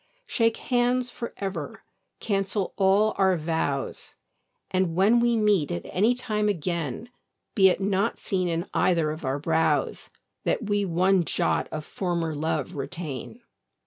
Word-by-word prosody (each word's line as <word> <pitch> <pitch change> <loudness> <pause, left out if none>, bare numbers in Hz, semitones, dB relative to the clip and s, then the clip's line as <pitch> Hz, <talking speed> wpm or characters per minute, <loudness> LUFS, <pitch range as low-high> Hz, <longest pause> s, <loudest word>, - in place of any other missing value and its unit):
Shake 230 - +1
hands 245 0 +1
for 235 - -6
ever, 195 -1 -5 0.4
cancel 195 -1 -1
all 200 +2 +3
our 190 -2 +4
vows, 155 -4 -2 0.6
And, 185 -3 +1
when 205 +6 +4
we 235 -1 +2
meet 205 -8 +2
at 85 - -4
any 220 +7 +2
time 210 -4 -1
again, 170 - -3 0.4
Be 190 -3 +6
it 185 - 0
not 200 +3 0
seen 185 -3 -1
in 170 +1 -1
either 165 -4 +2
of 155 +1 -7
our 130 +1 0
brows 160 +2 0 0.3
That 220 - -1
we 205 -1 +1
one 185 +1 +3
jot - - 0
of 155 -1 -5
former 170 -4 -2
love 160 +4 -2
retain. 145 -2 -6
190 Hz, 145 wpm, -26 LUFS, 165-210 Hz, 0.6 s, Be